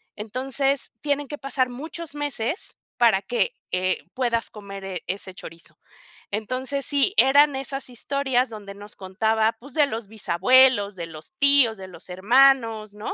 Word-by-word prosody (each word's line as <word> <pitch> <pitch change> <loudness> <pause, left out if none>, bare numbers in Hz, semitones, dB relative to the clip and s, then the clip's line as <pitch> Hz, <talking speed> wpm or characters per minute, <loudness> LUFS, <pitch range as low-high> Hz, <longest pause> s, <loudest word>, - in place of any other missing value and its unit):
Entonces, 265 +5 -1
tienen 290 -1 -1
que 295 - -5
pasar 270 -2 -1
muchos 310 +5 -6
meses 290 - -3 0.2
para 225 -5 +4
que, 245 - -1 0.2
eh, 185 0 0
puedas 240 -3 -1
comer, 200 -2 -9
eh, 185 -3 -5
ese 190 0 -4
chorizo. 165 -2 -12 0.5
Entonces, 255 +6 -2
sí, 285 +6 +2
eran 285 +2 +6
esas 270 0 -5
historias 260 +1 -1
donde 205 -3 -9
nos 205 +1 -11
contaba, 220 +4 0
pues, 270 +2 -13
de 295 -3 +4
los 225 -4 -5
bisabuelos, 215 +2 +3
de 170 -2 -6
los 160 - -12
tíos, 280 -5 +5
de 190 -1 -9
los 175 -1 -12
hermanos, 225 +1 +3
¿no?, 210 - -5
240 Hz, 150 wpm, -24 LUFS, 200-275 Hz, 0.5 s, eran